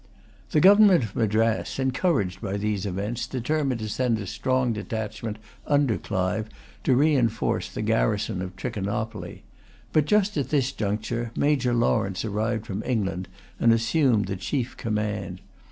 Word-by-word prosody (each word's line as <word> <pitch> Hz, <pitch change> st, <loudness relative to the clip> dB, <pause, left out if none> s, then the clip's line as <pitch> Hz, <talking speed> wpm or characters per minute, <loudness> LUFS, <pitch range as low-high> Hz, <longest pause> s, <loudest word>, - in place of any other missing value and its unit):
The 150 Hz, -, +3 dB
government 195 Hz, -, +7 dB
of 105 Hz, -, -6 dB
Madras, 110 Hz, 0 st, +1 dB
encouraged 130 Hz, -, 0 dB
by 100 Hz, -2 st, -2 dB
these 105 Hz, -1 st, -1 dB
events, 100 Hz, +6 st, -3 dB
determined 130 Hz, -1 st, -1 dB
to 110 Hz, -, -3 dB
send 115 Hz, +2 st, 0 dB
a 105 Hz, -, -5 dB
strong 130 Hz, +4 st, 0 dB
detachment, 110 Hz, 0 st, -4 dB, 0.3 s
under 145 Hz, -6 st, +2 dB
Clive, 100 Hz, +2 st, -2 dB, 0.4 s
to 130 Hz, -, +4 dB
reinforce 130 Hz, -6 st, +2 dB
the -, -, -4 dB
garrison 100 Hz, -, 0 dB
of 95 Hz, 0 st, -6 dB
Trichinopoly. 110 Hz, +1 st, -4 dB, 0.5 s
But 155 Hz, -2 st, +4 dB
just 210 Hz, 0 st, +2 dB
at 135 Hz, -3 st, -1 dB
this 135 Hz, -3 st, +1 dB
conjuncture, 115 Hz, +1 st, -2 dB
Major 135 Hz, -4 st, +2 dB
Lawrence 110 Hz, -4 st, +1 dB
arrived 110 Hz, +1 st, -1 dB
from 105 Hz, -2 st, -4 dB
England, 100 Hz, -6 st, -2 dB, 0.3 s
and 115 Hz, -, +5 dB
assumed 115 Hz, -1 st, +3 dB
the 95 Hz, 0 st, -4 dB
chief 125 Hz, +5 st, -2 dB
command. 105 Hz, -4 st, -3 dB
115 Hz, 140 wpm, -25 LUFS, 105-130 Hz, 0.5 s, government